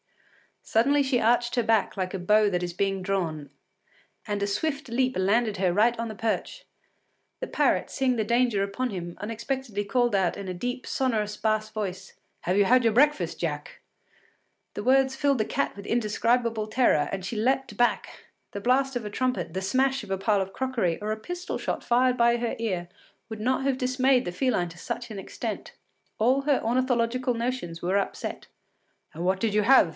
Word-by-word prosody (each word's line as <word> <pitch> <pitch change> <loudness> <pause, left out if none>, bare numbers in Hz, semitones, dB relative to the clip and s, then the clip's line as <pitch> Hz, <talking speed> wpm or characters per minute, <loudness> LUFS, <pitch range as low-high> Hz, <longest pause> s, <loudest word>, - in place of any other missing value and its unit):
Suddenly 280 +6 +3
she 265 -2 +1
arched 240 +2 +2
her 240 - +2
back 220 -1 +1
like 185 0 -2
a 195 - -3
bow 210 +3 +4
that 180 -2 -1
is 175 - -2
being 195 +1 -1
drawn, 170 -6 -2 0.8
and 205 -2 -2
a 200 - +1
swift 275 +7 -2
leap 255 +2 +1
landed 205 +3 +2
her 185 -2 +1
right 230 +5 +3
on 230 - -2
the 215 - -7
perch. 225 +2 -3 0.7
The - - -4
parrot, - - +1
seeing 260 -2 +1
the 220 - 0
danger 235 -2 +2
upon 225 +6 -2
him, 175 -3 -5
unexpectedly 230 0 -3
called 240 +1 +1
out 190 -3 +1
in 200 -1 -6
a 185 - -3
deep, 245 +7 -4
sonorous 215 -5 0
bass 215 0 0
voice: 195 -3 -5 0.3
“Have 180 +2 0
you 205 - +5
had 250 +4 +4
your 225 -2 +3
breakfast, 295 +5 +2
Jack?” - - -4 0.9
The - - -5
words 265 +2 +3
filled 280 -2 +1
the 215 - +1
cat 280 - -1
with 200 0 -10
indescribable 230 0 +1
terror; 215 - +2
and 190 -2 -4
she 225 - -4
leapt 255 +1 0
back. 240 +3 0 0.3
The 200 - -5
blast 265 +3 +2
of 245 - -2
a - - -3
trumpet, 205 -8 -2
the 190 - -2
smash 265 +6 +1
of 210 - -11
a 195 - 0
pile 200 +1 +1
of 190 0 -5
crockery, 240 -11 -1
or 210 +1 -2
a 215 - -2
pistol 355 - -5
shot - - -3
fired 250 +1 +3
by 235 0 +4
her 235 -1 -2
ear 185 -6 -2 0.4
would 220 -1 -6
not 260 +3 +1
have 270 -1 +1
dismayed 255 0 +2
the 175 - -3
feline 195 -4 0
to 165 - -13
such 235 +6 -5
an 205 - -6
extent. - - -6 0.4
All 255 +5 +3
her 285 -2 +2
ornithological 250 +1 +1
notions 230 -8 -3
were 185 +3 +1
upset. 200 - -4 0.7
“And 170 +3 -4
what 190 +1 +1
did 220 0 0
you 210 0 +3
have? 250 -6 +6
225 Hz, 195 wpm, -26 LUFS, 195-255 Hz, 0.9 s, have